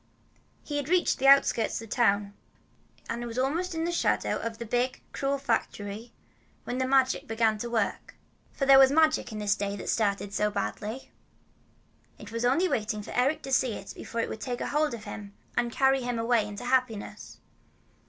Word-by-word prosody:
He 290 - -3
had 290 0 -3
reached 360 -5 +2
the 270 - +2
outskirts 275 -4 +5
of 225 - -9
the - - -4
town, 205 -4 +2 0.7
and 235 +1 -3
was 230 +1 -7
almost 325 +7 -1
in 325 - -1
the 340 - -1
shadow 345 - +1
of 230 -1 -4
the 235 - -6
big, 245 +3 -1
cruel 275 0 -1
factory, 225 -3 -3 0.5
when 250 - -4
the 260 - 0
Magic 265 -1 +2
began 225 -1 +1
to 235 - -4
work. 225 -4 -2 0.4
For 275 - -2
there 270 0 +8
was 265 -1 +8
magic 310 -3 +3
in 215 - -6
this 205 -1 +1
day 200 0 -3
that 200 - -7
had - - -6
started 200 -2 0
so 210 +1 +1
badly. 210 - -4 1.1
It - - -11
was 230 +1 -2
only 290 +10 +3
waiting 215 - -2
for - - -9
Eric 265 +5 +1
to 270 - -6
see 255 -2 +2
it 195 - -8
before 230 - -4
it - - -3
would 220 - -6
take 245 -2 -3
hold 300 -3 0
of 220 - -10
him 205 -1 -8 0.2
and 240 - 0
carry 270 +2 +3
him 245 -1 -2
away 230 -2 +2
into 210 +4 -7
happiness. 250 -4 -1
240 Hz, 195 wpm, -28 LUFS, 215-270 Hz, 1.1 s, there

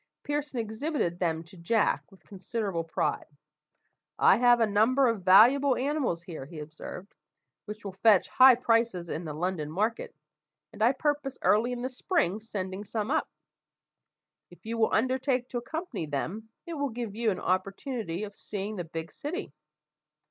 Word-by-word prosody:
Pearson 290 -2 -3
exhibited 220 - -2
them 165 -2 0
to 170 +4 -16
Jack 205 +5 0
with 195 - -19
considerable 195 -3 -3
pride. 165 - -2 0.9
"I - - +6
have 245 0 +5
a 225 - +4
number 225 +6 +3
of 230 -4 0
valuable 245 +9 +6
animals 265 - -1
here," 160 -6 -8
he 165 - -11
observed, 155 +5 -9 0.5
"which 210 0 -8
will 195 - -4
fetch 195 +1 +4
high 260 -1 +7
prices 230 -7 +1
in 170 - -4
the 155 - -5
London 170 -2 -2
market, 215 +8 -2 0.6
and - - -10
I 235 +4 +5
purpose 290 -1 -1
early 225 +4 +3
in 245 0 -4
the 255 - -1
spring 250 - 0
sending 200 -3 -5
some 215 +3 -3
up. 315 - 0 1.2
If - - -18
you 230 +1 -3
will 220 - +3
undertake 255 +1 +1
to 245 - -2
accompany 255 - -5
them, 165 - -4 0.2
it 340 - -6
will 285 -3 -1
give 230 -3 -5
you 230 +1 0
an 190 - -1
opportunity 195 - -2
of 205 -1 -6
seeing 205 +1 -5
the 175 - -2
big 165 0 -7
city. 295 - -5
220 Hz, 165 wpm, -28 LUFS, 185-250 Hz, 1.2 s, high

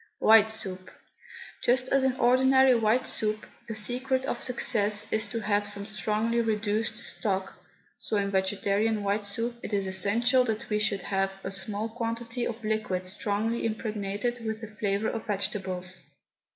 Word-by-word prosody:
WHITE 220 0 +6
SOUP. 190 -4 -4 0.7
Just 255 +1 +3
as 275 -1 +3
in 265 -1 +2
ordinary 260 +1 +5
white 230 +2 +2
soup 215 0 -2 0.2
the 225 - -4
secret 255 +4 0
of - - -3
success 215 -4 +1
is 220 0 +2
to 225 +2 -4
have 205 0 +1
some 205 0 -2
strongly 215 +2 0
reduced 220 0 -1
stock, 190 -3 -3 0.5
so 215 - -1
in 200 -1 0
vegetarian 200 +2 +1
white 200 +1 0
soup 230 +4 -3
it 210 - -6
is 200 -1 +1
essential 220 +7 +3
that 220 -2 -2
we 210 - +2
should 210 -3 +1
have 195 -1 0
a 190 - -4
small 200 +3 -2
quantity 230 +1 -3
of 230 0 -6
liquid 215 -4 -1
strongly 210 +4 -1
impregnated 215 +1 -2
with 220 0 -3
the 225 - -6
flavour 210 0 -1
of 225 - -5
vegetables. 190 -3 -2
215 Hz, 155 wpm, -28 LUFS, 200-230 Hz, 0.7 s, WHITE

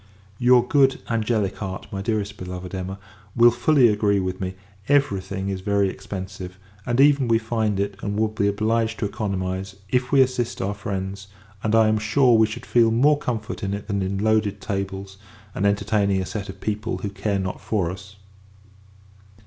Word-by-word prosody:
Your 125 0 +5
good, 135 -1 +3
angelic 110 -3 0
heart, 95 -2 -5
my 95 - -4
dearest 105 -1 -2
beloved 90 0 -7
Emma, 95 +1 -4 0.4
will 120 0 +7
fully 125 +2 +4
agree 105 -2 +2
with 95 0 -3
me, 95 0 -3 0.3
every 140 -9 +3
thing 95 +1 -4
is 95 -1 -3
very 100 0 +1
expensive; 95 -1 -7 0.3
and, 120 +1 0
even 140 -2 +5
we 115 -1 +4
find 110 -3 -1
it, 100 0 -1
and 100 0 -3
will 110 +1 +2
be 105 -1 0
obliged 110 +2 0
to - - -2
economise, 95 -2 -3
if 125 +1 0
we 140 -1 +6
assist 125 -2 0
our 100 +2 -1
friends: 100 -1 -5 0.3
and, 110 +1 +1
I 110 -1 +5
am 110 0 +2
sure, 120 +3 +4
we 110 -1 +5
should 120 +3 -7
feel 115 -2 +4
more 140 +6 +4
comfort 115 -4 -4
in 100 0 -2
it 100 - -7
than 100 -2 -1
in 95 +1 -2
loaded 105 -1 +1
tables, 95 -1 -4 0.4
and 100 - +1
entertaining 100 -1 +1
a 95 - -2
set 100 0 -5
of 95 0 -9
people 110 +1 -2
who 100 - -4
care 100 0 -1
not 95 -1 -4
for 95 -6 -1
us. 100 +1 -11
105 Hz, 185 wpm, -23 LUFS, 95-115 Hz, 0.4 s, will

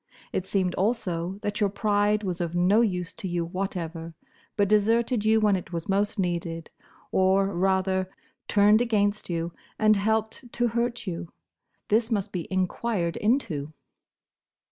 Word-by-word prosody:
It 185 - -2
seemed 185 -3 0
also, 185 -4 -1
that 205 0 -2
your 205 - +3
pride 205 +1 +1
was 180 -2 -3
of 170 0 -2
no 185 +6 +4
use 180 -6 -1
to 205 - -6
you 175 -1 -1
whatever, 170 -3 -4 0.4
but 205 -1 +3
deserted 225 +3 +2
you 220 0 +4
when 210 -2 +3
it 180 -1 -5
was 170 -2 -4
most 205 +3 0
needed, 170 -3 -2 0.4
or, 190 +1 +3
rather, 190 0 +1 0.4
turned 210 +2 +5
against 210 -4 0
you, 170 0 -2 0.2
and 215 0 +4
helped 220 +4 -1
to 240 0 +1
hurt 235 +1 -2
you. 175 -2 -5 0.6
This 225 +2 +2
must 205 -5 -1
be 175 -3 -4
enquired 185 -1 -1
into. 205 - 0
195 Hz, 145 wpm, -26 LUFS, 175-215 Hz, 0.6 s, turned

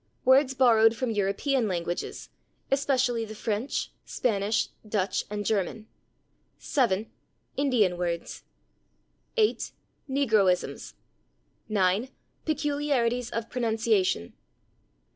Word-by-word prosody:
Words 270 +1 +5
borrowed 230 -3 +5
from 250 0 -1
European 215 +5 +1
languages, 175 -2 -3 0.4
especially 265 -4 +2
the 215 -1 -7
French, 220 +5 -2
Spanish, 210 -2 0 0.2
Dutch 205 -2 0
and 205 0 -4
German. 210 +1 -1 0.7
7. 220 -7 +1 0.5
Indian 245 -10 +2
words. 170 -1 -3 1.0
8. 430 -1 +2 0.4
Negroisms. 220 -10 +1 0.8
9. 200 +4 +2 0.4
Peculiarities 285 -6 0
of 230 -1 -3
pronunciation. 220 - 0
225 Hz, 85 wpm, -27 LUFS, 200-260 Hz, 1.0 s, Words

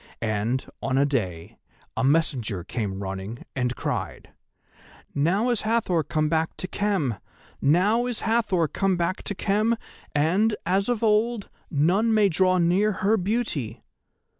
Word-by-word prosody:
And, 110 +3 -1 0.2
on 135 0 0
a 140 - +4
day, 95 - -3 0.4
a - - -1
messenger 130 - +1
came 100 -1 -4
running 95 +4 -6
and 125 -2 -1
cried: - - -4 0.8
"'Now 185 - +1
is 235 - 0
Hathor 215 -6 +1
come 155 +1 0
back 160 +1 0
to 185 - -4
Khem, 185 - -1 0.4
now 200 - +3
is 245 -3 -3
Hathor 220 -7 +1
come 195 +3 0
back 175 +2 -1
to 205 - -4
Khem, 215 +4 +1 0.4
and, 190 +9 +2
as 195 +5 +1
of 235 -2 0
old, 220 0 +2 0.2
none 190 +10 +2
may 210 -2 +4
draw 185 +2 +3
near 180 +5 +3
her 215 +2 +5
beauty! 200 - -2
175 Hz, 140 wpm, -25 LUFS, 135-210 Hz, 0.8 s, her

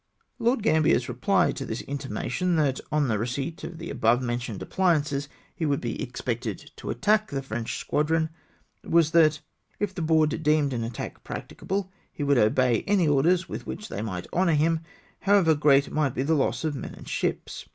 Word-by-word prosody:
Lord 235 -1 +1
Gambler's 160 -8 +3
reply - - +2
to - - -5
this - - -4
intimation, 140 +5 -2
that 145 -4 +1
on 150 -2 +2
the 110 -3 0
receipt 135 +8 -3
of 170 - -6
the 170 +1 -6
above 115 +2 +3
mentioned 120 -4 -3
appUances 150 -6 +1 0.3
he - - -4
would 145 -3 +1
be 120 -2 -4
expected 120 -3 -4
to - - -7
attack 215 - +2
the 135 -1 -3
French 115 -3 -4
squadron, 160 +2 0 0.5
was, 165 -2 +3
that 155 -2 +4 0.2
" - - -41
if 205 -2 -1
the 180 - -5
Board 160 0 +2
deemed 150 -2 +2
an 115 -2 -2
attack 115 0 -6
practicable, 195 -1 -4 0.2
he 145 - -5
would 140 -3 +3
obey 120 +2 +3
any 195 -5 +3
orders 170 +6 +3
with - - -7
which 210 - -6
they - - -4
might 95 -5 -4
honour 180 -1 +3
him, 160 +2 +2 0.4
how 200 0 +3
ever 170 -5 +5
great 145 -2 +4
might 150 -4 0
be 130 - 0
the 160 +4 +1
loss 145 +1 +1
of 155 -2 0
men 140 - -6
and - - -13
ships." - - -3
150 Hz, 190 wpm, -26 LUFS, 130-165 Hz, 0.5 s, ever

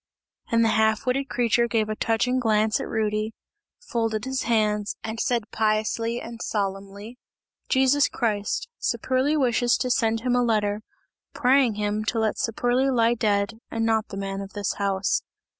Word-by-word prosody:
And 230 0 +4
the - - +3
half 220 0 +2
witted 270 +2 0
creature 235 0 +2
gave 225 -2 0
a 215 - -3
touching 240 +4 +1
glance 215 -2 +2
at - - -4
Rudy, 215 0 -1 0.4
folded 225 - -2
his 265 0 -2
hands 210 -2 +1
and 220 0 -5
said 235 -4 -1
piously 220 +2 0
and 235 0 -8
solemnly: 200 +3 -4 0.5
"Jesus 265 +2 +4
Christ! 210 -4 -1
Saperli 265 +4 0
wishes 245 -3 +2
to 255 0 -1
send 225 -1 +1
him 250 0 +1
a 245 - +3
letter, 210 -3 +1 0.5
praying 260 -4 +3
him 210 0 -1
to 230 - -1
let 220 -1 0
Saperli 245 +4 +1
lie 235 -2 +3
dead 215 -1 0
and 225 0 -1
not 220 -1 +1
the 195 - -8
man 195 0 -4
of 195 0 -9
this 205 -2 -2
house!" 195 -1 +1
225 Hz, 160 wpm, -25 LUFS, 210-245 Hz, 0.5 s, And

